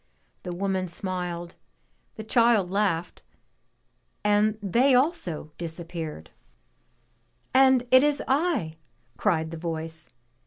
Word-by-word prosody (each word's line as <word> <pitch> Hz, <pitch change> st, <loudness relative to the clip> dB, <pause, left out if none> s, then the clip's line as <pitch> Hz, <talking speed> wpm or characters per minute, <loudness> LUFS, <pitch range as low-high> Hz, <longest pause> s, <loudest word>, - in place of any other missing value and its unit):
The 180 Hz, -, -6 dB
woman 190 Hz, +1 st, -1 dB
if -, -, -8 dB
smiled, 175 Hz, -1 st, -4 dB, 0.6 s
the 220 Hz, -, -7 dB
child 225 Hz, -4 st, +3 dB
laughed, 190 Hz, -4 st, -1 dB, 1.0 s
and 210 Hz, +1 st, +2 dB
they 240 Hz, +7 st, +3 dB
also 245 Hz, -, 0 dB
disappeared. 165 Hz, -, -6 dB, 1.2 s
And 260 Hz, -1 st, +5 dB
it 255 Hz, 0 st, +8 dB
is 290 Hz, 0 st, +1 dB
I!" 270 Hz, -, 0 dB, 0.4 s
cried 160 Hz, -6 st, 0 dB
the 165 Hz, -, -6 dB
voice. 160 Hz, -1 st, -5 dB
185 Hz, 105 wpm, -26 LUFS, 165-235 Hz, 1.2 s, it